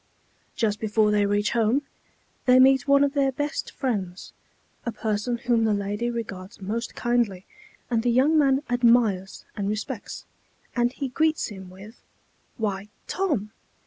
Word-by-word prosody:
Just 210 -2 0
before 215 0 +2
they 205 -1 +3
reach 205 +1 +1
home, 235 +4 +2 0.6
they 250 0 +7
meet 265 +1 +5
one 280 0 +5
of 280 -1 +1
their 275 -2 +2
best 290 +3 -3
friends, 195 -8 -4 0.5
a 235 - -2
person 220 +2 -2
whom 235 -2 +1
the 215 -2 +2
lady 205 +4 -2
regards 215 -4 -6
most 220 +5 -4
kindly, 235 -6 0 0.5
and 230 -1 +2
the 245 - +1
young 265 +6 +4
man 275 -2 +3
admires 230 -6 +2
and 200 -1 -2
respects, 215 +2 -5 0.5
and 240 0 +2
he 275 0 -4
greets 315 +4 +1
him 190 -3 -9
with, 195 +5 -13 0.6
"Why, 205 -3 -2 0.2
Tom! 295 - -1
230 Hz, 145 wpm, -25 LUFS, 205-255 Hz, 0.6 s, they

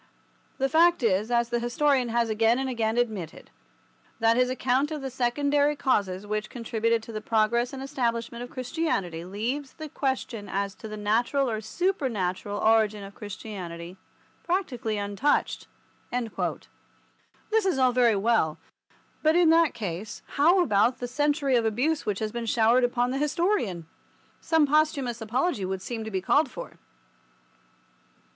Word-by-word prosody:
The 270 - +1
fact 335 +1 +4
is, 210 0 +2
as 235 -1 +1
the 240 0 0
historian 250 +1 +1
has 235 0 +1
again 225 +2 +2
and 265 0 -1
again 230 -3 -1
admitted, 215 -9 -3 0.7
that 225 0 +4
his 250 +1 +3
account 260 +2 +1
of 305 -3 -5
the 265 - -4
secondary 285 +4 +1
causes 200 -9 0
which 215 +1 -3
contributed 230 -1 -1
to 230 - -9
the 215 -1 -5
progress 230 +3 +1
and 270 -1 -6
establishment 235 -3 -2
of 245 - -8
Christianity 245 - -2
leaves 235 +10 -4
the 315 - -8
question 260 -6 -3
as 200 0 -2
to 220 - -10
the 215 0 -7
natural 235 +6 +1
or 220 -2 -2
supernatural 220 - -2
origin 215 -1 +2
of 195 0 -10
Christianity 185 -5 -7 0.5
practically 255 - -1
untouched." 205 +8 0 1.8
This 445 0 +3
is 365 - +1
all 255 -1 +4
very 240 -3 +3
well, 195 -7 +1 0.6
but 310 +1 +3
in 345 -2 +5
that 330 -1 +4
case 205 0 -5
how 345 +6 +4
about 215 -2 +2
the 245 - -4
century 285 +1 +1
of 235 - +3
abuse 250 +8 0
which 205 -2 0
has 215 0 -3
been 235 0 -4
showered 230 +3 +3
upon 245 0 +1
the 270 - -2
historian? 300 - 0 0.5
Some 320 -2 +3
posthumous 285 -5 +1
apology 230 - -1
would 190 0 -3
seem 230 -2 -4
to - - -4
be 190 -3 -2
called 290 +8 +3
for. - - -9
235 Hz, 150 wpm, -26 LUFS, 215-275 Hz, 1.8 s, in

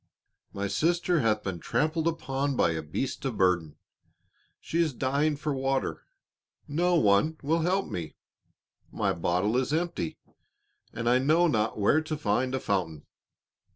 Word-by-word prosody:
"My 100 0 -3
sister 170 - +1
hath 110 -4 +1
been 95 -3 -4
trampled 160 - 0
upon 140 -4 -1
by 85 - +3
a 80 -1 -2
beast 80 - -4
of 130 -6 -3
burden. 85 -5 +1 0.8
She 170 - -1
is 155 -4 +1
dying 140 +4 0
for 150 0 -2
water, 135 -11 -2 0.6
no 175 +4 +1
one 115 +5 +3
will 160 +4 +1
help 185 +4 +1
me, 85 -3 -6 0.8
my - - 0
bottle 90 +6 0
is 130 +1 0
empty, 165 - -2 0.7
and 115 +1 -4
I 125 +1 +4
know 155 +6 +3
not 110 -10 0
where 110 +9 +3
to 155 -1 -4
find 130 +1 0
a - - -1
fountain." 85 - -2
130 Hz, 150 wpm, -28 LUFS, 100-155 Hz, 0.8 s, I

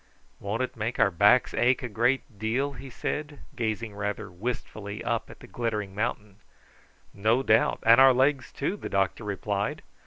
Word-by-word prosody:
"Won't 105 +5 -2
it 130 - -5
make 115 +1 -3
our 100 - +4
backs 105 +8 +4
ache 125 +3 +2
a 120 +3 +2 0.2
deal?" 120 +7 -1
he 135 - -10
said, 150 +4 -4 0.2
gazing 110 -2 -2
rather 105 -2 -4
wistfully 105 0 -5
up 115 -1 -2
at - - -13
the - - -11
glittering 105 -5 -3
mountain. 105 -1 -3 0.8
"No 110 +6 +2
doubt, 110 -2 +3
and 115 +3 +7
our 135 0 +9
legs 130 +1 +1
too," 180 +9 -2
the - - -6
doctor 95 +3 0
replied. 100 0 -3
115 Hz, 160 wpm, -27 LUFS, 105-125 Hz, 0.8 s, our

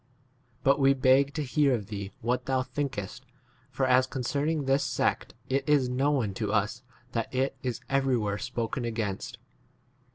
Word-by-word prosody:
But 135 +2 +4
we 135 0 +5
beg 130 +1 +4
h 140 - -16
to 155 - -1
hear 140 +1 +2
of 105 -4 -4
thee 100 -1 -6
what 120 +2 -1
thou 130 -1 +1
thinkest, 130 -4 -4 0.5
for 130 +1 0
as 130 0 +4
concerning 145 +4 -1
this 135 +1 +2
sect - - -1
it 135 +1 0
is 140 -4 +4
known 130 -4 +1
to 105 -2 0
us 105 +3 0 0.3
that 115 -1 -2
it 130 +1 0
is 125 -2 -2
23 135 - -4
everywhere 120 -7 +1
spoken 120 0 -3
against. 110 -4 -3
130 Hz, 165 wpm, -28 LUFS, 115-135 Hz, 0.5 s, we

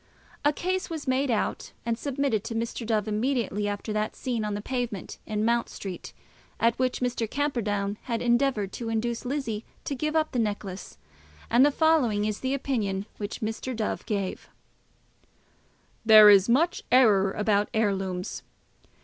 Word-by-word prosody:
A 290 - +4
case 370 +5 -2
was 320 -4 -5
made 260 +2 +1
out 225 -3 -1
and 230 -1 0
submitted 270 -4 -1
to 225 - -4
Mr. 230 0 -3
Dove 215 -2 0
immediately 215 -2 0
after 205 +1 -3
that 215 0 -1
scene 240 -4 -2
on 210 -1 -2
the - - -3
pavement 240 -5 -4
in 215 0 -1
Mount 235 0 +1
Street, 190 -3 -7 0.5
at 230 0 +3
which 255 0 0
Mr. 240 -3 -1
Camperdown 215 -8 -1
had 235 -3 -1
endeavoured 240 -4 +1
to 230 -2 -4
induce 230 +2 -2
Lizzie 245 -5 -3 0.2
to - - -3
give 305 +3 -2
up 315 -1 +2
the 250 - -1
necklace; 205 - -4 0.5
and 240 +3 +6
the 290 - +6
following 275 -9 +2
is 210 -1 -2
the 260 +1 -1
opinion 210 -8 -2
which 205 0 -5
Mr. 225 +3 -3
Dove 220 -1 -2
gave: 200 -3 -3 1.5
There 215 -2 +9
is 200 +1 +5
much 320 +9 +2
error 210 -7 +5
about 210 -1 +1
heirlooms. 195 -4 -1
225 Hz, 160 wpm, -27 LUFS, 210-260 Hz, 1.5 s, There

